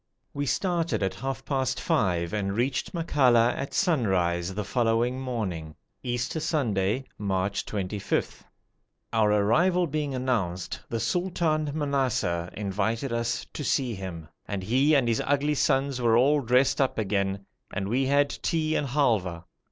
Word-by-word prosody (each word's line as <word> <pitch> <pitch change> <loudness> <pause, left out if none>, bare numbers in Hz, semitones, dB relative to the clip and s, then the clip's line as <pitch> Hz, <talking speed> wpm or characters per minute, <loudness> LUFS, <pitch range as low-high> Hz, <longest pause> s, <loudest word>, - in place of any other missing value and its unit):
We 145 0 -2
started 170 - 0
at 95 -1 0
half 135 +8 -5
past 130 -2 -1
five 90 - 0
and 100 -1 -1
reached 125 +2 0
Makalla 125 -8 +3
at 135 - -4
sunrise 95 - +1
the 105 - -2
following 120 +3 +1
morning, 95 -12 -4 0.3
Easter 120 +5 -2
Sunday, 120 - 0 0.2
March 100 -1 -1
25. 100 -1 -2 0.7
Our 110 -2 +3
arrival 165 - +3
being 150 -3 -2
announced, 95 -9 -2
the 115 - -2
Sultan 170 -2 0
Manassar 130 - 0
invited 105 +5 -1
us 115 -1 -1
to 150 - -4
see 130 -3 0
him, 90 -5 -7 0.2
and 100 -2 -3
he 135 +9 +3
and 135 -4 +3
his 115 -1 +1
ugly 145 +1 +1
sons 135 -2 +1
were 115 -1 +4
all 145 +4 +4
dressed 125 +3 +3
up 135 - +1
again, 100 -2 -1 0.3
and 95 0 -3
we 130 +5 +1
had 140 +1 +3
tea 155 -1 0
and 145 - 0
halwa. 110 - 0
120 Hz, 145 wpm, -27 LUFS, 100-140 Hz, 0.7 s, were